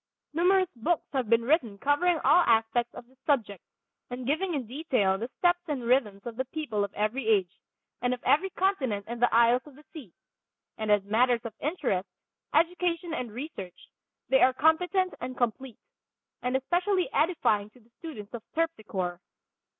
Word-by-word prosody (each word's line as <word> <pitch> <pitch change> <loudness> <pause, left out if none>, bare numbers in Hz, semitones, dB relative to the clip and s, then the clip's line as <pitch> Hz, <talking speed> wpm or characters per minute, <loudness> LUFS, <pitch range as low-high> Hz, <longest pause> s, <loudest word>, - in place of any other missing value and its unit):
Numerous 365 +3 +3
books 305 +8 0
have 260 -5 -1
been 230 0 +4
written 240 - +1
covering 290 - +2
all 355 - +6
aspects 230 +1 +2
of - - -9
this 260 +1 -27
subject, 230 - 0 0.5
and 245 0 -6
giving 320 +6 0
in 265 -4 -2
detail 245 -7 0
the 235 +3 -4
steps 350 0 +2
and 285 -5 -3
rhythms 230 -5 +1
of 235 -1 -7
the 260 - -1
people 255 -7 -3
of 200 - -3
every 215 +4 -1
age, 200 -4 +1 0.4
and 245 +1 +1
of 250 -1 -4
every 375 +7 +3
continent 270 - -1
and 235 +1 -6
the 245 - +4
isles 235 +2 +5
of 290 - -14
the 300 +2 -18
sea; 275 - -10 0.6
and 215 -1 -2
as 205 -1 +4
matters 235 +4 +2
of 230 - -5
interest, 270 - -1 0.4
education 340 +1 +1
and 250 -7 -4
research 215 - -8 0.4
they 265 - +4
are 260 - +5
competent 360 +6 +2
and 255 0 -5
complete, 240 0 -2 0.6
and 250 +1 +1
especially 360 +7 0
edifying 275 - +1
to 230 - -21
the 235 0 -27
student 250 -12 -9
of 235 - -5
Terpsichore. 210 - -2
255 Hz, 170 wpm, -28 LUFS, 220-320 Hz, 0.6 s, all